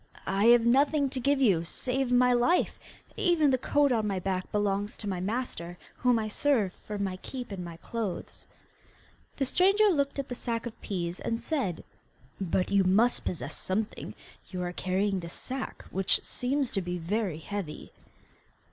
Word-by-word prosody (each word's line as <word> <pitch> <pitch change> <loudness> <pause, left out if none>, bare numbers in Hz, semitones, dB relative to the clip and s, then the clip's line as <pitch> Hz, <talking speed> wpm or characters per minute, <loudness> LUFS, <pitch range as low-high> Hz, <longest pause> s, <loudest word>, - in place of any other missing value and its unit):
'I 195 +2 +1
have 235 0 +7
nothing 280 +3 +3
to 270 - -2
give 280 +3 +2
you 195 -11 +4
save 250 +9 -2
my 250 0 +5
life; 245 +9 +2 0.4
even 330 -6 +3
the 260 - +3
coat 290 +2 +3
on 220 -3 +1
my 195 -2 -1
back 185 0 -2
belongs 205 +1 0
to 210 - -5
my 190 -3 -2
master, 185 -4 -3 0.2
whom 250 -1 +3
I 220 -1 -1
serve 215 -4 +1
for 210 - -7
my 195 -2 -2
keep 250 +4 -7
and 190 -2 -4
my 170 -1 -8
clothes.' 215 0 -5 0.9
The 275 - +1
stranger 390 +9 +4
looked 285 -6 +1
at 275 -1 -2
the - - -4
sack 235 -1 -3
of 235 -2 -8
peas, 175 -3 -3
and 230 - -2
said, 255 - -2 0.6
'But 185 -1 0
you 200 -1 +5
must 215 +7 +3
possess 175 - -3
something; 210 +3 -3 0.3
you 180 -2 -3
are 175 0 -3
carrying 190 +2 0
this 170 -1 -7
sack, 265 0 -5
which 190 0 +1
seems 265 +1 -1
to 195 - 0
be 180 0 -3
very 185 0 -1
heavy. 165 -2 -6
215 Hz, 175 wpm, -29 LUFS, 185-255 Hz, 0.9 s, have